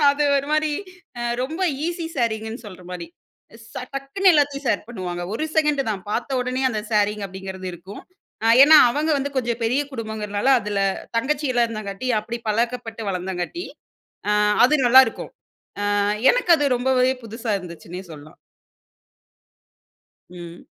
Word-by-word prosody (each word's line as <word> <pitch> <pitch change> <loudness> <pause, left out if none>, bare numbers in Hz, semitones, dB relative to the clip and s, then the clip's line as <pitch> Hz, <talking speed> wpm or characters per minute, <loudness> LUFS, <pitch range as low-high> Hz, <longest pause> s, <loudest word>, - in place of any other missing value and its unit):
அது 290 +1 -1
ஒரு 275 +1 -1
மாதிரி 310 0 +2 0.5
அ - - -3 0.2
ரொம்ப 320 +8 -4 0.2
ஈஸி 340 -1 -3
ஷேரிங்குன்னு 225 -1 -2
சொல்ற 185 -3 -11
மாரி 175 -2 -6 0.7
ச - - -19 0.2
டக்குனு 275 +8 +2
எல்லாத்தையும் 285 -2 +1
ஷேர் 220 -4 +1
பண்ணுவாங்க. 180 -6 -5
ஒரு 310 - -2
செகண்ட் 300 -2 +3
தான், 195 -3 -4
பார்த்த 255 +4 -1
உடனே 255 +1 -2
அந்த 215 -3 -2
ஷேரிங் 210 -1 +1
அப்படிங்கிறது 190 0 -8
இருக்கும். 185 +4 -10 0.6
ஏன்னா 310 +2 +9
அவங்க 300 +5 -1
வந்து 280 +1 -3
கொஞ்சம் 240 -2 -1
பெரிய 250 +5 +1
குடும்பங்கிறதுனால 220 -1 -3
அதுல 205 0 -3 0.4
தங்கச்சியேல்லாம் 255 -1 +1
இருந்தங்காட்டி, 215 0 -6
அப்படி 235 +3 -5
பழக்கப்பட்டு 230 +1 -2
வளர்ந்தங்காட்டி 185 - -4 0.7
அ - - +3 0.3
அது 300 - +1
நல்லாருக்கும். 260 +2 +5 0.7
அ - - +2 0.3
எனக்கு - - -2
அது 290 - +1
ரொம்பவே 255 +1 +2
புதுசா 225 +1 -5
இருந்துச்சுன்னே 175 0 -9
சொல்லலாம். 150 0 -13 1.9
ம். 175 -1 -11
235 Hz, 135 wpm, -22 LUFS, 200-275 Hz, 1.9 s, ஏன்னா